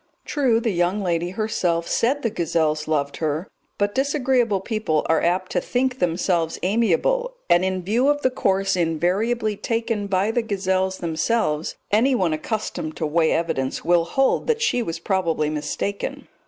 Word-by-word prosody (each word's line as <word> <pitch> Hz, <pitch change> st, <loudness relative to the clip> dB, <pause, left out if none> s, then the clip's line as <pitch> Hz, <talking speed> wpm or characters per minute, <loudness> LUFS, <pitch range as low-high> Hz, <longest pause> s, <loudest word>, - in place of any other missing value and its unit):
True, 255 Hz, -6 st, +2 dB
the 230 Hz, -1 st, 0 dB
young 175 Hz, +3 st, +1 dB
lady 175 Hz, -1 st, 0 dB
herself 180 Hz, -4 st, -1 dB
said 270 Hz, +5 st, +1 dB
the 230 Hz, -, 0 dB
gazelles 160 Hz, -5 st, 0 dB
loved 140 Hz, -2 st, -1 dB
her; 155 Hz, +3 st, -2 dB, 0.3 s
but 205 Hz, 0 st, 0 dB
disagreeable 260 Hz, -6 st, +1 dB
people 195 Hz, -7 st, -1 dB
are 160 Hz, -1 st, +3 dB
apt 180 Hz, +2 st, 0 dB
to 180 Hz, -, +1 dB
think 255 Hz, +4 st, -1 dB
themselves 170 Hz, -1 st, 0 dB
amiable, 235 Hz, -, +1 dB, 0.2 s
and 175 Hz, +1 st, +5 dB
in 185 Hz, -1 st, -1 dB
view 230 Hz, +8 st, +1 dB
of 290 Hz, 0 st, +1 dB
the 260 Hz, -, +3 dB
course 195 Hz, -4 st, +1 dB
invariably 190 Hz, +7 st, 0 dB
taken 225 Hz, -1 st, -2 dB
by 195 Hz, +2 st, +1 dB
the 240 Hz, -, +1 dB
gazelles 190 Hz, -3 st, -1 dB
themselves 165 Hz, -1 st, -1 dB, 0.2 s
anyone 215 Hz, -6 st, +3 dB
accustomed 155 Hz, -2 st, -4 dB
to 160 Hz, -, -1 dB
weigh 160 Hz, +1 st, +2 dB
evidence 135 Hz, -6 st, -1 dB
will 170 Hz, -1 st, +3 dB
hold 270 Hz, +10 st, +1 dB
that 465 Hz, -1 st, +1 dB
she 250 Hz, -, +2 dB
was 165 Hz, -7 st, -3 dB
probably 165 Hz, -4 st, 0 dB
mistaken. 175 Hz, +6 st, -3 dB
190 Hz, 155 wpm, -23 LUFS, 165-230 Hz, 0.3 s, and